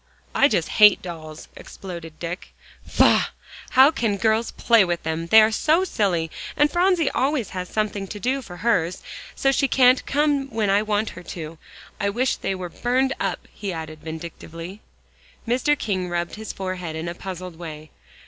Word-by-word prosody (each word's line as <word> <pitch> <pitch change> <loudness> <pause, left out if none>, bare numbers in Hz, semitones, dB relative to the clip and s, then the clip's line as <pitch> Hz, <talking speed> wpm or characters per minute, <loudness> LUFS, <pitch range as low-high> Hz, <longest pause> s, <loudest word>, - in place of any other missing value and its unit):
"I 280 - +5
just 170 - 0
hate 210 -2 +6
dolls," 160 -3 -8
exploded 170 -4 -9
Dick. 170 +1 -6 0.3
"Faugh! - - +3 0.4
how 265 +3 +6
can 225 -9 -1
girls 220 +2 +1
play 230 -3 +4
with 175 -2 -2
them; 160 +1 -3
they're 220 +3 +7
so 320 +10 +2
silly. 180 - 0 0.3
And 295 0 +4
Phronsie 355 -3 +2
always 265 -4 0
has 180 -1 -5
something 210 -2 -2
to 205 - -7
do 260 +6 0
for 180 -8 -10
hers, 180 -6 +1 0.3
so 270 - +2
she 275 0 +2
can't 255 -1 +4
come 285 -1 +1
when 215 -4 0
I 200 +1 +4
want 215 0 -1
her 180 - -10
to. 165 -2 -8 0.4
I 200 - +1
wish 250 +5 0
they 195 - -2
were 180 -1 -6
burned 255 +7 0
up," - - -3
he 200 -2 -5
added 160 -2 -7
vindictively. 165 +3 -8 0.7
Mr. 260 +5 +2
King 185 -7 -2
rubbed 175 0 -2
his 220 0 -6
forehead 185 -4 -5
in 160 +2 -4
a 170 - -3
puzzled 180 -1 -7
way. 155 -3 -8
200 Hz, 170 wpm, -23 LUFS, 170-245 Hz, 0.7 s, they're